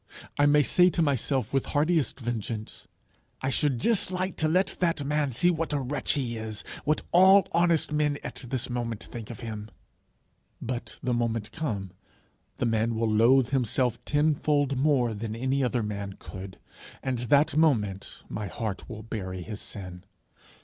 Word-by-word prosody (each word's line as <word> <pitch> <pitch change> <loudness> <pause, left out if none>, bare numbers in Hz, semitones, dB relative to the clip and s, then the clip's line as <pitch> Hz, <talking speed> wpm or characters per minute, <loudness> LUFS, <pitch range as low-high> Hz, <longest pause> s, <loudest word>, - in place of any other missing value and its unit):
I 145 - +6
may 145 0 +5
say 180 +5 +5
to 170 - -1
myself 135 -2 0
with 135 - +1
heartiest 155 -2 +1
vengeance, 115 -2 -5 0.6
'I 130 - +1
should 135 -3 +1
just 225 - +2
like 185 0 -2
to 155 - +1
let 180 +5 +1
that 165 -5 +1
man 145 -1 0
see 175 +9 +3
what 165 -2 -2
a 145 - +1
wretch 135 +2 0
he 125 -5 -2
is 110 -1 -5 0.2
what 150 +1 +1
all 190 +2 +7
honest 170 -2 +2
men 150 -1 +1
at - - -6
this 130 -1 -2
moment 120 -3 -3
think 115 -3 -8
of 115 - -8
him!' 110 -2 -6 0.9
but, 125 0 -5
the 125 -1 0
moment 115 -2 -1
come, 105 - -3 0.7
the - - 0
man 115 0 +1
will 110 -1 0
loathe 120 +3 +5
himself 125 -2 0
tenfold 145 -2 +1
more 130 -4 +2
than 110 +1 -4
any 130 +3 0
other 120 -2 0
man 100 -2 -4
could, 95 -1 -9 0.5
and 130 -3 -1
that 140 +4 +3
moment 110 -12 +1
my 105 -1 -4
heart 105 +2 -5
will 110 -2 -7
bury 95 -5 -5
his 105 +3 -7
sin. 95 -3 -8
125 Hz, 165 wpm, -27 LUFS, 110-150 Hz, 0.9 s, all